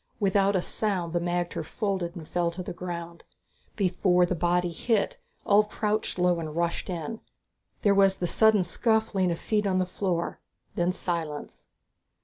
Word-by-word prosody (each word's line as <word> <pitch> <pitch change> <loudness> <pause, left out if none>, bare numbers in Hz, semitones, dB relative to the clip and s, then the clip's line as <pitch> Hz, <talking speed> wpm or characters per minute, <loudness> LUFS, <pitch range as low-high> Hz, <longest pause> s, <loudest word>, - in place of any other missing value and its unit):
Without 200 -1 +3
a 180 - +1
sound 185 -6 -1
the 175 - +2
magter 175 -1 -2
folded 185 0 -2
and 160 -3 -8
fell 175 -1 0
to 175 +2 -6
the - - -5
ground. 170 -1 -6 0.5
Before 180 -2 +3
the 175 - -1
body 175 +1 +1
hit, 215 +5 0 0.3
Ulv 210 +1 +4
crouched 215 -1 -1
low 180 -1 +2
and 155 -2 -5
rushed 170 +2 -1
in. 180 +5 -4 0.6
There 205 - +5
was 195 -1 +4
the 180 - -2
sudden 215 +2 +4
scuffling 220 -1 +1
of 170 - -1
feet 210 +2 0
on 185 -1 +1
the 185 - +2
floor, 180 -2 -2 0.3
then 175 +1 +1
silence. 165 -5 -4
180 Hz, 160 wpm, -27 LUFS, 170-200 Hz, 0.6 s, There